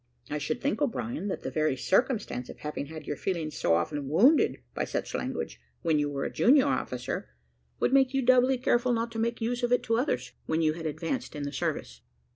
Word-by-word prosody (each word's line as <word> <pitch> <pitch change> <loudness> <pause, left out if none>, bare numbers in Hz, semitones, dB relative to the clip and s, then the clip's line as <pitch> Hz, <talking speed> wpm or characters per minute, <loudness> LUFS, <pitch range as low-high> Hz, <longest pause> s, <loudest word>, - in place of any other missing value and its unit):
"I 150 - -1
should 145 +11 -2
think, 285 +1 -1
O'Brien, 240 -4 -1
that 195 - -3
the - - -3
very 155 -4 +1
circumstance 195 - 0
of - - -9
having 150 -1 -5
had 155 0 -8
your 145 - -3
feelings 160 -4 -3
so 85 - +2
often 135 - -2
wounded 250 - +4
by - - -1
such - - -3
language - - -3 0.2
when 160 -3 +3
you 145 0 +1
were 140 -1 -3
a - - -3
junior 270 +3 +5
officer, 125 - -2 0.5
would - - +1
make 265 -1 +5
you 270 -1 0
doubly 255 +1 +5
careful 245 0 +2
not 230 0 -1
to 225 - -4
make 235 +1 -1
use 240 +2 -1
of 240 0 0
it 245 - +3
to 225 0 +1
others, 255 +5 -1 0.2
when 160 +1 +1
you 155 -1 +3
had 165 0 -4
advanced 165 - -3
in 145 - -4
the 145 0 -4
service." 60 - -3
195 Hz, 220 wpm, -28 LUFS, 150-245 Hz, 0.5 s, junior